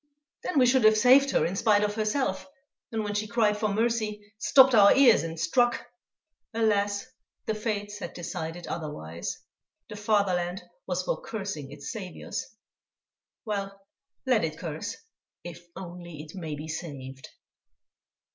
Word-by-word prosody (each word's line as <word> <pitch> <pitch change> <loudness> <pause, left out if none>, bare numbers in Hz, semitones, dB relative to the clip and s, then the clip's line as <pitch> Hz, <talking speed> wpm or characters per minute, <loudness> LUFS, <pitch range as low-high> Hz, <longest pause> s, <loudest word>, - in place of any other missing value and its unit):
Then 335 - -2
we 255 - +6
should 250 0 +4
have 215 0 +6
saved 265 +5 +6
her 155 - +2
in 175 +3 -2
spite 210 0 +3
of 210 0 0
herself, 215 -3 -1 0.4
and 220 -1 -1
when 205 0 -3
she 210 +1 -1
cried 215 -2 +2
for 215 +1 0
mercy, 210 -1 -1
stopped 265 +3 +6
our 205 -3 +7
ears 265 -5 +6
and 165 0 -5
struck! 240 +9 +2 0.7
Alas! 205 -1 +1 0.4
the 220 - 0
fates 205 -1 -3
had - - -7
decided 170 0 -5
otherwise; 85 - -5 0.5
the 210 - -7
fatherland 195 -4 0 0.2
was - - -1
for - - -2
cursing 195 -10 -5
its 145 -1 -7
saviours. 190 -6 -6 1.0
Well, 195 -2 -3 0.5
let 250 -7 +3
it 155 -1 -2
curse, 165 +4 -5 0.5
if 175 0 -10
only 175 -4 -8
it 155 - -12
may 160 -5 -5
be 150 +2 -7
saved! 135 -5 -7
205 Hz, 145 wpm, -27 LUFS, 170-220 Hz, 1.0 s, our